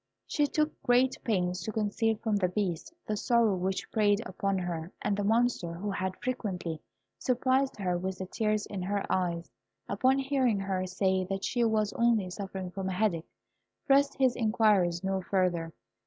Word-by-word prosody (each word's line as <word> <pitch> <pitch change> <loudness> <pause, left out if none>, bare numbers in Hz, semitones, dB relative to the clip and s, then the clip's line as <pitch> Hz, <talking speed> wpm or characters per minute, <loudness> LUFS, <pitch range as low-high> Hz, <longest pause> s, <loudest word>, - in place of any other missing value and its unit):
She 295 -2 +1
took 305 +2 -1
great 250 +1 +3
pains 180 -5 0
to 220 - -3
conceal 220 +1 0
from 215 -1 0
the 185 -2 +2
Beast 180 - -2
the 215 - -1
sorrow 230 0 +3
which 185 +1 -2
preyed 205 -2 +3
upon 195 +1 -1
her; 175 -2 -3
and 205 - 0
the 205 - -1
Monster, 225 -5 +1
who 200 +4 -3
had 190 -1 -2
frequently 185 -10 -3 0.4
surprised 260 +1 +1
her 180 -3 -1
with 190 +1 -3
the 190 - -4
tears 215 +1 0
in 195 -2 -5
her 200 +2 -1
eyes, 170 -2 -1 0.4
upon 260 +1 +2
hearing 265 -6 +1
her 190 -1 -1
say 190 0 +1
that 195 +1 -3
she 240 -2 +1
was 215 -2 +1
only 225 -6 +2
suffering 190 -1 -5
from 190 0 -3
a - - -2
headache, 180 -4 0 0.6
pressed 280 0 +4
his 260 -2 +3
inquiries 210 -6 +2
no 190 0 0
further. 175 -3 0
200 Hz, 170 wpm, -30 LUFS, 185-230 Hz, 0.6 s, pressed